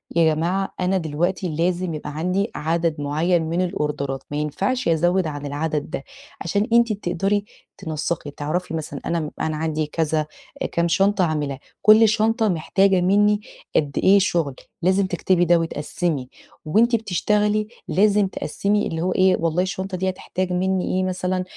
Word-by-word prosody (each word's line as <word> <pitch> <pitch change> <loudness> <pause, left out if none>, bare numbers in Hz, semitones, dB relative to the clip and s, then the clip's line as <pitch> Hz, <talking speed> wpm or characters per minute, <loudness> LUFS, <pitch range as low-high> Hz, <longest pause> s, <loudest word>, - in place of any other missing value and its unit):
"يا 165 -2 +4
جماعة 185 +5 -1
أنا 185 +1 +1
دلوقتي 175 +3 -1
لازم 175 +1 0
يبقى 150 -1 -6
عندي 185 +6 0
عدَد 165 0 -1
معيّن 160 +5 +1
من 170 +3 -1
الأوردرات 145 -6 -2
ما 145 - -2
ينفَعش 195 - -1
أزوّد 175 +2 +2
عن 145 -1 -5
العدد 150 +1 -2
ده." - - -5 0.4
عشان 200 +6 0
أنتِ 235 -2 +4
تقدَري 195 +1 -1 0.3
تنسّقي، 155 -3 -3
تعرَفي 160 +4 -3
مثلًا 150 -3 -4
أنا 170 - 0 0.2
أنا 155 -1 -1
عندي 155 -1 -1
كذا، 155 0 -1 0.5
كام 170 0 +1
شنطة 195 +2 +2
هاعملها، 145 -4 -2 0.2
كل 215 +1 +7
شنطة 220 +1 +2
محتاجة 190 +3 +2
منّي 205 +3 +3 0.3
قد 145 -2 +1
إيه 200 +1 +6
شُغل، 170 -8 0 0.3
لازم 190 +3 +3
تكتِبي 175 -1 +1
ده 175 0 +5
وتقسّمي 150 -3 -2 0.4
وأنتِ 225 +9 +3
بتشتغلي، 210 +1 +1 0.2
لازم 205 +2 +3
تقسّمي 200 +4 -1
اللي 165 0 -3
هو 185 +2 0
إيه، 185 0 +4
والله 165 +2 +1
الشنطة 190 0 -4
دي 190 +1 0
هتحتاج 185 0 -3
منّي 185 +1 0
إيه، 185 - +1
مثلًا 185 0 -1
180 Hz, 155 wpm, -22 LUFS, 155-195 Hz, 0.5 s, كل